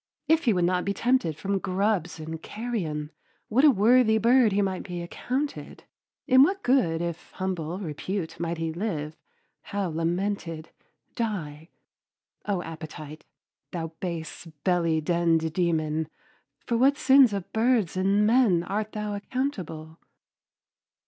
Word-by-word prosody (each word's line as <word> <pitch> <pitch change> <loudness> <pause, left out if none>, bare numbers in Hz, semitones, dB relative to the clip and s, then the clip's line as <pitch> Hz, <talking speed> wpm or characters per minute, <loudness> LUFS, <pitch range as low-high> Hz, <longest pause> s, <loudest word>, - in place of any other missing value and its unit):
If 320 0 +3
he 230 - +4
would 180 -2 +2
not 180 0 +1
be 200 0 -2
tempted 230 - +1
from 195 +3 -1
grubs 190 -3 -1
and 160 +1 -6
carrion, 175 -10 -4 0.4
what 250 +6 +3
a 305 - +9
worthy 225 0 +4
bird 235 +1 +4
he 195 - +1
might 190 -2 0
be 175 -2 -6
accounted. 265 +11 -4 0.4
In 260 +1 +6
what 390 +7 +3
good 175 -11 +2
if 170 -1 -5
humble 180 -3 -3
repute 175 0 -4
might 170 0 -2
he 165 0 -2
live, 160 -5 -3 0.5
how 200 -3 -3
lamented, 165 0 -2 0.4
die. 165 -9 -4 0.8
O 195 -4 0
Appetite! 155 -1 -9 0.5
thou 165 -2 -3
base 170 -1 -5 0.2
belly 170 -3 +2
denned 165 -1 +1
demon, 160 -3 0 0.6
for 235 - 0
what 275 +4 +4
sins 265 -4 +6
of 200 -3 -5
birds 225 -5 +2
and 195 +3 +2
men 215 -7 +4
art 210 +4 -3
thou 210 -1 -3
accountable! 200 - -4
185 Hz, 135 wpm, -26 LUFS, 165-220 Hz, 0.8 s, a